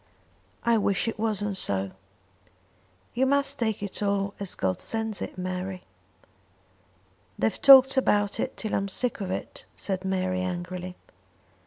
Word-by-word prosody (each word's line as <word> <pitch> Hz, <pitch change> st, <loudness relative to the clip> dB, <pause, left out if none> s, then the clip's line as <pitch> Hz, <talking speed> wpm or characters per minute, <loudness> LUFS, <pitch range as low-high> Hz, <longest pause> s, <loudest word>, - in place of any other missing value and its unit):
"I 235 Hz, -1 st, +3 dB
wish 200 Hz, +1 st, +1 dB
it 225 Hz, -, -3 dB
wasn't 205 Hz, -3 st, -1 dB
so." 95 Hz, -, -1 dB, 1.2 s
"You 260 Hz, +2 st, +2 dB
must 280 Hz, +1 st, +1 dB
take 220 Hz, -3 st, -1 dB
it 200 Hz, -, -5 dB
all 200 Hz, -1 st, 0 dB
as 200 Hz, -2 st, -4 dB
God 95 Hz, -1 st, -1 dB
sends 220 Hz, -2 st, -3 dB
it, -, -, -6 dB
Mary." 185 Hz, 0 st, -4 dB, 1.5 s
"They've 110 Hz, -, -1 dB
talked 270 Hz, -1 st, +9 dB
about 205 Hz, -6 st, +2 dB
it -, -, -3 dB
till 220 Hz, -, -4 dB
I'm 195 Hz, -, 0 dB
sick 240 Hz, +3 st, -1 dB
of 190 Hz, -, -3 dB
it," 185 Hz, -, -5 dB
said 190 Hz, -2 st, -2 dB
Mary 185 Hz, -1 st, -1 dB
angrily. 180 Hz, 0 st, -4 dB
200 Hz, 140 wpm, -27 LUFS, 185-220 Hz, 1.5 s, talked